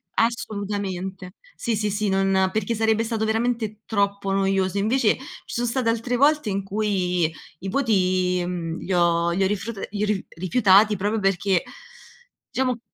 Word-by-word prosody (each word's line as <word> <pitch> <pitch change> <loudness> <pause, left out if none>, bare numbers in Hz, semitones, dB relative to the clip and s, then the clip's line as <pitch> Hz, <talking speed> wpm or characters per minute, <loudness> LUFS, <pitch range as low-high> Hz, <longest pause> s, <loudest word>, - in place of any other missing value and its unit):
assolutamente. 200 -5 -2 0.2
Sì, 230 - -1
sì, 210 0 -1
sì, 210 +1 -1
non 190 0 +2
perché 215 +2 -1
sarebbe 220 0 +2
stato 225 -1 -1
veramente 220 -1 -1
troppo 200 -2 0
noioso. 195 -1 +1
Invece, 220 +2 +2
ci 260 - -12 0.2
sono 240 +1 -2
state 240 0 -1
altre 230 +2 0
volte 295 -2 +3
in 195 0 -1
cui 190 -5 0 0.3
i 195 - -5
voti, 185 -7 +1
mhmm, 170 -2 -4
li 190 - -3
ho 170 -1 +3
li 190 +3 +1
ho - - +3
rifrut 205 +1 -4
iru 210 0 0 0.2
rifiutati 200 +3 +4
proprio 205 +3 -1
perché 195 -2 +1 0.9
diciamo 255 -2 -1
200 Hz, 150 wpm, -24 LUFS, 190-220 Hz, 0.9 s, rifiutati